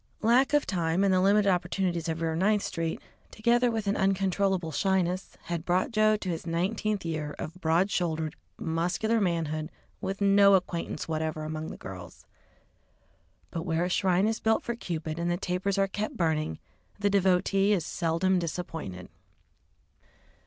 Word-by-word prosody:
Lack 250 +5 +4
of 295 - +3
time 170 0 0
and 195 -1 +3
the 185 - +3
limited 200 +2 +4
opportunities 180 -2 0
of 160 +1 -3
Rear 160 -1 0
Ninth 205 +4 +2
Street, 165 -1 -3 0.3
together 240 +2 +2
with 225 -2 -2
an 200 +1 +1
uncontrollable 190 -2 +1
shyness, 185 +3 0
had 170 -2 -3
brought 180 +5 +1
Joe 215 -1 +3
to 190 - -5
his 165 0 -4
nineteenth 195 +4 -1
year 155 -2 -3
of 180 +4 -7
broad 170 +5 +2
shouldered, 160 -4 -1 0.2
muscular 180 +8 0
manhood, 160 -4 -1 0.3
with 195 +1 -3
no 200 0 +6
acquaintance 175 -4 -2
whatever 155 -1 -2
among 155 0 -4
the - - -7
girls. 90 -3 -10 1.3
But 165 - -3
where 165 0 0
a - - -2
shrine 185 0 +2
is 220 0 -1
built 220 0 +2
for 235 - -2
Cupid 165 -6 -4
and 170 +1 -1
the 175 - +1
tapers 190 +2 -1
are 195 0 +3
kept 215 +7 -4
burning, 155 - 0 0.4
the 205 0 +1
devotee 195 +1 +3
is 180 -6 +1
seldom 180 +3 +1
disappointed. 160 - -5
180 Hz, 160 wpm, -28 LUFS, 165-200 Hz, 1.3 s, no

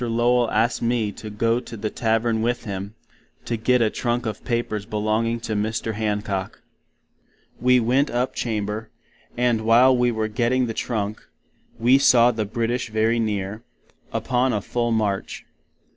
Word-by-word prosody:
Lowell 120 +1 +2
asked 115 +3 +1
me 115 -3 0
to 110 +2 -9
go 115 +3 +1
to 120 -2 -9
the 105 +1 -3
Tavern 115 0 0
with 120 +2 -1
him, 100 0 -6 0.5
to 120 - -1
git 120 +2 +2
a 110 - +1
Trunk 120 0 -1
of 110 -2 -4
papers 115 -4 -2
belonging 110 +2 0
to 110 - -3
Mr. 110 +2 -2
Hancock. 105 -3 -3 1.0
We 125 0 +4
went 130 +5 +2
up 125 +2 -1
Chamber; 110 -1 -3 0.5
and 120 -2 +2
while 120 +4 +5
we 125 0 +2
were 110 -1 -1
giting 120 +3 +1
the 115 - -3
Trunk, 110 -2 -3 0.6
we 125 +4 +4
saw 120 -3 +6
the 110 -2 -2
British 115 +2 -2
very 110 +2 +1
near, 105 -1 -2 0.5
upon 125 0 0
a 105 - -1
full 120 -1 -1
March. 105 -3 -2
115 Hz, 155 wpm, -23 LUFS, 110-120 Hz, 1.0 s, saw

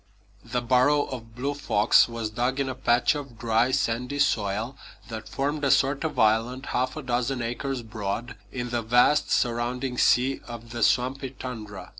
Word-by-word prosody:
The 120 +1 -3
burrow 130 +4 +3
of 115 -3 -8
Blue 140 +3 -2
Fox 120 -6 +3
was 115 -2 -4
dug 125 +4 -1
in 135 - 0
a 130 - -2
patch 125 -1 +2
of 140 -5 -7
dry, 115 +2 +2
sandy 125 +1 -1
soil 110 -1 0 0.3
that 110 -1 -7
formed 145 +2 -2
a 140 - +2
sort 135 +2 +3
of 160 - -3
island 115 +5 +2
half 130 +4 -1
a 155 - -5
dozen 125 0 -1
acres 125 +2 -3
broad 110 +2 -4 0.2
in 120 -2 -4
the 120 -1 0
vast 125 +6 +3
surrounding 125 +1 0
sea 130 +2 +3
of 115 -1 -9
the 120 0 -5
swampy 130 +4 +1
tundra. 115 -6 -8
125 Hz, 170 wpm, -26 LUFS, 115-135 Hz, 0.3 s, burrow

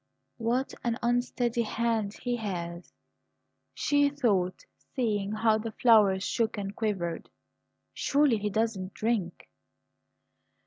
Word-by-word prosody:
"What 240 +3 -1
an 235 -1 0
unsteady 240 0 +1
hand 225 -2 -1
he 245 -1 0
has," 175 -5 -5 0.8
she 285 0 +3
thought, 205 -11 0 0.3
seeing 210 -6 0
how 215 0 +2
the 220 0 -5
flowers 210 -6 +5
shook 225 0 0
and 200 0 -4
quivered. 190 -7 -2 0.6
"Surely 280 -6 +2
he 210 0 -1
doesn't 205 -3 -2
drink!" 215 -6 -2
220 Hz, 105 wpm, -29 LUFS, 200-240 Hz, 0.8 s, flowers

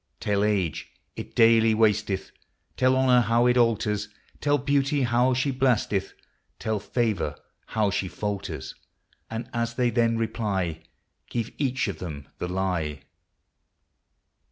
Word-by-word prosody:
Tell 100 0 +1
age 100 -7 0 0.3
it - - -8
daily 115 -1 +5
wasteth; 105 -3 +1 0.4
Tell 130 0 +3
honor 130 -2 +5
how 120 +1 +2
it 125 0 +4
alters; 110 -4 +1 0.3
Tell 145 0 +2
beauty 140 0 +1
how 125 +1 +2
she 130 +2 +1
blasteth; 125 -7 +1 0.4
Tell 110 -1 -2
favor 100 - -1 0.3
how 105 -2 +1
she 95 -1 -1
falters; 105 +1 -4 0.6
And 115 +2 -5
as 115 0 -1
they 125 -1 +2
then 115 0 +2
reply, 100 -7 -2 0.5
Give 115 -2 -3
each 130 -4 0
of 100 - -4
them 75 -6 -7
the - - -2
lye. 90 -6 -2
115 Hz, 130 wpm, -26 LUFS, 100-125 Hz, 0.6 s, daily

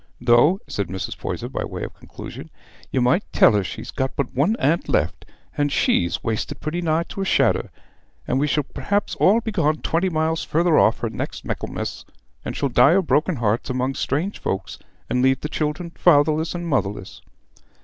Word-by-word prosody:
"Though," 120 +10 +4
said 100 - -3
Mrs. 95 +1 -5
Poyser, - - -4
by - - -4
way - - -5
of - - -6
conclusion, - - -10 0.4
"you 130 - 0
might 125 +10 +3
tell - - +6
her 105 -2 +1
she's - - -7
got 130 0 -2
but 140 -3 -2
one 155 - +2
aunt 160 +5 +1
left, - - 0 0.3
and 145 0 0
she's 85 -9 +1
wasted 110 -2 -3
pretty 165 +3 -3
nigh 165 0 +1
to 195 - -5
a - - +1
shadder; 195 - +2 0.6
and 130 - +1
we 145 - +2
shall 150 0 +1
p'rhaps 200 +8 -2
all 215 +5 +5
be 220 - -4
gone 155 -6 +1
twenty 175 +3 +1
mile 160 -1 0
farther 165 +1 +1
off 110 - +3
her 115 - -1
next - - -5
Michaelmas, - - -4 0.4
and - - -5
shall 140 - 0
die 125 +6 +5
o' 195 - +3
broken 155 +4 +1
hearts 115 0 -1
among 130 +1 -1
strange 155 +10 -2
folks, 95 - -4 0.3
and 125 - 0
leave 130 0 +3
the - - -2
children 155 +3 -3
fatherless 160 0 +3
and 175 0 -4
motherless." 105 - -2
150 Hz, 190 wpm, -22 LUFS, 125-170 Hz, 0.6 s, tell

